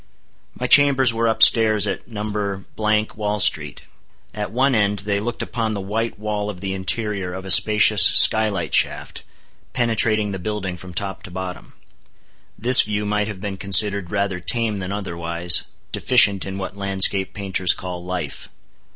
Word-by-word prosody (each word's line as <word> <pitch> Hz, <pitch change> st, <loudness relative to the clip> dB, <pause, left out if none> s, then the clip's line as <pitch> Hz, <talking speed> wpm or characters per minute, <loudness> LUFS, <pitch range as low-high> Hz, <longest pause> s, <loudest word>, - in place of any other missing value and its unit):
My 125 Hz, -, -3 dB
chambers 135 Hz, -2 st, +4 dB
were 115 Hz, 0 st, -1 dB
up 110 Hz, -, +3 dB
stairs 110 Hz, -3 st, +4 dB
at -, -, -5 dB
No.—Wall 105 Hz, 0 st, -4 dB
street. -, -, +1 dB, 0.5 s
At 105 Hz, -1 st, -6 dB
one 130 Hz, +4 st, 0 dB
end 105 Hz, -2 st, 0 dB
they 100 Hz, -1 st, -1 dB
looked 120 Hz, +3 st, -5 dB
upon 110 Hz, -2 st, -4 dB
the -, -, -5 dB
white 110 Hz, +4 st, -4 dB
wall 105 Hz, -1 st, -4 dB
of 95 Hz, -4 st, -8 dB
the 95 Hz, 0 st, -5 dB
interior 95 Hz, -1 st, -3 dB
of 95 Hz, 0 st, -9 dB
a 95 Hz, -, 0 dB
spacious 105 Hz, +1 st, +5 dB
sky 110 Hz, +5 st, +6 dB
light 90 Hz, -8 st, -5 dB
shaft, -, -, -1 dB, 0.5 s
penetrating 110 Hz, -3 st, +1 dB
the 95 Hz, -, -6 dB
building 100 Hz, -1 st, -5 dB
from 90 Hz, 0 st, -13 dB
top 95 Hz, 0 st, -3 dB
to -, -, -11 dB
bottom. 90 Hz, 0 st, -8 dB, 0.8 s
This 125 Hz, +4 st, +6 dB
view 105 Hz, 0 st, -4 dB
might 105 Hz, 0 st, -2 dB
have 105 Hz, -3 st, -8 dB
been 100 Hz, -2 st, -6 dB
considered 100 Hz, -1 st, +3 dB
rather 100 Hz, -2 st, -3 dB
tame 110 Hz, +3 st, -1 dB
than 90 Hz, 0 st, -6 dB
otherwise, 85 Hz, -3 st, -1 dB, 0.3 s
deficient 100 Hz, -7 st, +2 dB
in 95 Hz, 0 st, -6 dB
what 95 Hz, 0 st, -7 dB
landscape 95 Hz, -1 st, +1 dB
painters 95 Hz, -3 st, -1 dB
call 90 Hz, -1 st, -8 dB
"life." 90 Hz, -5 st, -6 dB
100 Hz, 160 wpm, -20 LUFS, 95-110 Hz, 0.8 s, sky